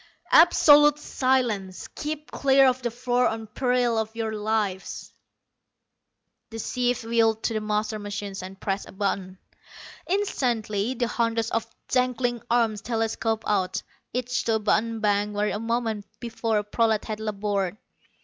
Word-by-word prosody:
"Absolute 295 -3 +7
silence. 240 - -1
Keep 305 0 -6
clear 270 0 +4
of 260 0 +2
the 240 - -1
floor 245 +1 +1
on 225 0 -3
peril 245 +1 +1
of 220 0 -4
your 225 -1 -2
lives." 210 -3 -2 1.4
The 225 - -7
chief 245 +1 -1
wheeled 225 -1 +2
to - - 0
the 215 - -1
master 215 0 -1
machine 205 -1 -5
and 190 +1 -9
pressed 195 0 -3
a - - -12
button. 190 -1 -2 0.7
Instantly, 245 - 0
the 240 0 0
hundreds 230 -1 0
of 230 0 -1 0.2
dangling 250 -2 0
arms 230 -3 +2
telescoped 225 -1 -1
out, 190 -3 0 0.3
each 250 +1 -1
to 225 - +2
a - - +1
button 220 +1 0
bank 205 0 +1
where 210 +1 0
a - - -3
moment 225 -2 -2
before 230 -2 -1
a 210 - 0
prolat 220 +1 +1
had 215 -1 -4
labored. 205 -2 -2
225 Hz, 145 wpm, -25 LUFS, 210-245 Hz, 1.4 s, Absolute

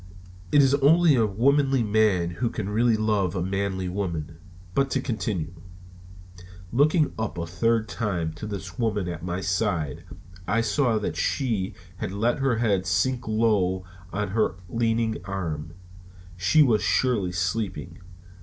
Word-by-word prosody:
It 145 -1 +6
is 135 0 +3
only 155 +4 +5
a 115 -4 +3
womanly 135 +5 +2
man 105 -5 +2
who 115 +8 -1
can 105 -4 -4
really 115 +2 +2
love 105 -4 0
a 90 - -1
manly 95 0 -2
woman. 85 -5 -4 0.4
But 135 +4 +1
to 135 - 0
continue: 95 - -3 1.2
Looking 150 +5 +3
up 110 -4 -3
a 85 - -2
third 115 +5 +1
time 90 -7 -2
to 85 +7 -7
this 95 -2 -7
woman 105 -5 0
at 85 -2 -5
my 90 +1 -3
side, 90 - -1 0.4
I 115 +3 +2
saw 115 +1 +1
that 105 - -3
she 110 -9 -1 0.2
had 90 - -4
let 115 +6 0
her 135 -3 +2
head 100 -5 +1
sink 120 +6 0
low 105 -5 +1 0.3
on 105 +1 -2
her 105 -2 +1
leaning 115 +1 0
arm. 85 -5 -4 0.6
She 90 - +4
was 115 -6 +3
surely 100 -1 +1
sleeping. 95 +4 -3
105 Hz, 145 wpm, -25 LUFS, 90-115 Hz, 1.2 s, It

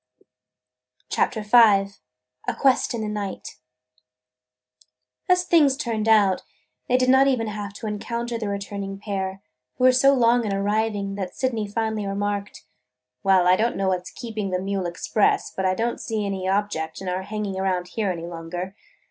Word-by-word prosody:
CHAPTER 220 -3 0
V 210 - -17
A 195 - +2
QUEST 265 -3 +2
IN 230 - -3
THE 215 - -2
NIGHT 205 -7 -5 1.7
AS 360 0 +4
things 295 -7 +4
turned 225 -6 -1
out, 205 -4 +4 0.5
they 250 - +4
did 255 0 +1
not 265 +1 +6
even 250 -4 +1
have 205 -2 -5
to 205 - -9
encounter 235 +3 -3
the 215 -2 -3
returning 200 0 -4
pair, 195 -1 -4 0.3
who - - -3
were 255 - +8
so 275 +2 +5
long 240 -1 +3
in 210 - -2
arriving 205 0 -1
that 185 -2 -5
Sydney 230 -5 -1
finally 220 -1 -2
remarked: 205 0 -3 0.6
"Well, 190 -2 +4
I 180 +1 +6
don't 230 +5 0
know 195 0 +1
what 180 -1 -2
's - - -7
keeping 220 -5 -5
the 180 -1 -1
mule 195 -1 -2
express, 175 +4 0
but 190 - -1
I 185 - +1
don't 235 +3 -2
see 220 -2 -2
any 190 -2 -3
object 195 -6 -1
in 190 - -7
our 180 +1 -1
hanging 200 -1 -4
around 185 -2 -1
here 210 -1 -1
any 170 -2 -4
longer. 175 +2 -6
205 Hz, 170 wpm, -24 LUFS, 190-225 Hz, 1.7 s, were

